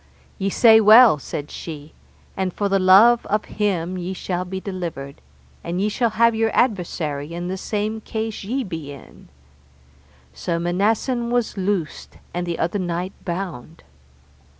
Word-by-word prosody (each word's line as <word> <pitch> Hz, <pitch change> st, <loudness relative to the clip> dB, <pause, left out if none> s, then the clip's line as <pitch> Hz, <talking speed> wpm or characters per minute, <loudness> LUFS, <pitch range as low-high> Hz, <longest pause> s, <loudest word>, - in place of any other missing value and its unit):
Ye 195 Hz, -, 0 dB
say 220 Hz, +2 st, +6 dB
well, 220 Hz, -, +7 dB
said 145 Hz, +1 st, -6 dB
she, 155 Hz, -2 st, -8 dB, 0.4 s
and 190 Hz, -1 st, -1 dB
for 205 Hz, +3 st, -2 dB
the 195 Hz, 0 st, +2 dB
love 200 Hz, +6 st, +6 dB
of 210 Hz, +1 st, 0 dB
him 185 Hz, -4 st, -2 dB
ye 180 Hz, +2 st, -4 dB
shall 180 Hz, -1 st, -3 dB
be 190 Hz, +1 st, -5 dB
delivered, 170 Hz, -8 st, -6 dB, 0.4 s
and 175 Hz, +2 st, -3 dB
ye 205 Hz, +2 st, +1 dB
shall 235 Hz, +2 st, 0 dB
have 230 Hz, +2 st, +3 dB
your 225 Hz, 0 st, +1 dB
adversary 170 Hz, -, -1 dB
in 175 Hz, +1 st, -4 dB
the 190 Hz, -, -2 dB
same 215 Hz, +3 st, -3 dB
case 220 Hz, -1 st, -4 dB
ye 255 Hz, +7 st, -2 dB
be 160 Hz, -8 st, -6 dB
in. 140 Hz, -, -14 dB, 1.1 s
So 70 Hz, -, -3 dB
Manassen 215 Hz, +8 st, 0 dB
was 240 Hz, -1 st, 0 dB
loosed 190 Hz, -4 st, -3 dB, 0.2 s
and 175 Hz, 0 st, -3 dB
the 170 Hz, -, -2 dB
other 175 Hz, +5 st, -1 dB
knight 180 Hz, +1 st, -3 dB
bound. 170 Hz, -5 st, -6 dB
190 Hz, 150 wpm, -21 LUFS, 170-215 Hz, 1.1 s, well